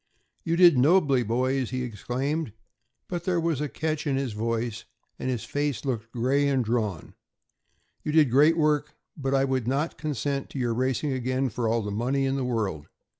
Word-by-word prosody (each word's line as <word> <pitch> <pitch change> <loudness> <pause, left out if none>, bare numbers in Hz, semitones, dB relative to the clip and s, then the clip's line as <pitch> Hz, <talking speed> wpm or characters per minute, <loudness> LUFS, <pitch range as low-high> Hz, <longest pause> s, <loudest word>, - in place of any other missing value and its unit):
"You 165 - 0
did 170 -6 +7
nobly, 145 -2 +4
boys," 125 +3 0
he 130 0 -2
exclaimed, 125 +4 -3 0.5
but 175 -2 -4
there 180 -2 +1
was 165 -4 0
a 150 - -2
catch 155 +1 -2
in 140 - +1
his 135 -4 -2
voice, 115 +1 -2 0.3
and 130 - -2
his 125 -4 -2
face 145 -5 -2
looked 115 -4 -3
gray 135 +4 +1
and 135 -3 +1
drawn, 110 -7 -2 0.9
"you 150 - -3
did 150 -5 +4
great 150 +6 +5
work, 150 -1 +1 0.2
but 135 -2 -1
I 135 0 +3
would 130 -3 -1
not 140 +5 -1
consent 140 -2 -2
to - - -8
your 120 -3 0
racing 130 +3 0
again 130 +1 -1
for 115 +1 -2
all 115 0 +1
the 105 - -4
money 130 +6 0
in 135 0 0
the 135 - -1
world. 105 -11 -2
130 Hz, 185 wpm, -26 LUFS, 120-145 Hz, 0.9 s, did